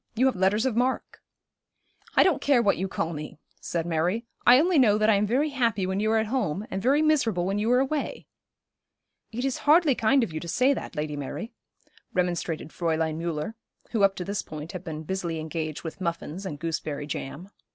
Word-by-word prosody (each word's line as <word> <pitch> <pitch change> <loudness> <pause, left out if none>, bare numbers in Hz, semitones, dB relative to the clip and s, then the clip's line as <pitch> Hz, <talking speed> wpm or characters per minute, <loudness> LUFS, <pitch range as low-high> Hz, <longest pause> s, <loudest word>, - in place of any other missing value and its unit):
You 250 +4 +3
have 265 - +3
letters 195 +5 +2
of 255 -4 0
mark.' 250 +2 -1 0.9
'I - - +7
don't 360 -8 +2
care 280 -3 +4
what 200 -4 +2
you 190 - -1
call 165 -2 -2
me,' 150 -1 -7 0.2
said 165 -1 -3
Mary. 175 +7 0 0.2
'I 245 +2 +9
only 340 0 +3
know 210 -5 +5
that 215 +1 +4
I - - +5
am 205 +1 +2
very 275 +8 +1
happy 230 -7 +1
when 190 +1 -1
you 215 +1 +1
are 225 - +3
at 220 - +2
home, 210 - -1
and 190 - -2
very 280 +7 +3
miserable 230 - +2
when 195 +2 0
you 220 +3 +1
are 250 - +5
away.' 275 +2 -2 1.1
'It 245 +4 -3
is 270 - -1
hardly 315 -2 +6
kind 250 +3 +3
of 200 - -4
you 155 - -3
to 170 - -8
say 255 +10 +3
that, 260 - -6
Lady 150 0 -2
Mary,' 145 - -5 0.6
remonstrated 175 -3 -1
Fräulein 160 -2 -1
Müller, 165 +3 -3 0.4
who, 225 - 0
up 195 -1 +4
to 180 - -5
this 200 +1 -2
point, 155 +2 -8
had 185 -1 -7
been 160 -2 -6
busily 170 -1 -3
engaged 155 -1 -4
with 165 +3 -7
muffins 170 +2 -3
and 150 - -5
gooseberry 150 -2 -3
jam. 150 +5 -6
195 Hz, 210 wpm, -26 LUFS, 165-245 Hz, 1.1 s, I